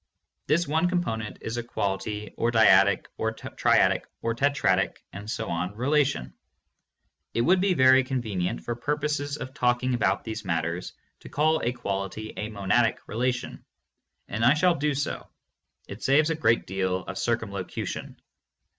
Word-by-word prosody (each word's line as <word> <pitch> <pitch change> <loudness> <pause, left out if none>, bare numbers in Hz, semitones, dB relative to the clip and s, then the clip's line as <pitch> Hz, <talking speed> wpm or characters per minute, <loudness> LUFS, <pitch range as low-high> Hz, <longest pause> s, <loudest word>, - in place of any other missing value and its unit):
This 170 +4 +2
one 160 +4 +2
component 115 -12 -2
is 110 +2 -4
a 120 - -2
quality 105 -1 -3
or 115 - +1
dyadic 100 -4 +5
or - - 0
triadic - - +2 0.2
or 115 - 0
tetradic... 115 -8 +1 0.8
relation. 140 - +1 1.0
It 115 - +2
would 180 +8 +4
be 190 -1 +2
very 130 -1 +6
convenient, 105 - -2
for 120 - -3
purposes 145 +2 -2
of 130 -2 -7
talking 125 +1 +1
about 100 -5 +1
these 110 -1 -5
matters, 85 -1 -2 0.3
to - - -12
call 155 +2 +2
a 120 - 0
quality 110 -2 -4
a 105 - -4
"monadic 110 +3 +1
relation" 125 +2 -2 0.6
and 110 +3 -3
I 120 +5 +6
shall 180 +3 +4
do 150 -1 -1
so; 145 - -3 0.6
it 100 - -9
saves 150 +4 +3
a - - 0
great 115 -7 +2
deal 95 -1 -1
of - - -6
circum - - -1
locution. - - -5
120 Hz, 145 wpm, -26 LUFS, 100-145 Hz, 1.0 s, very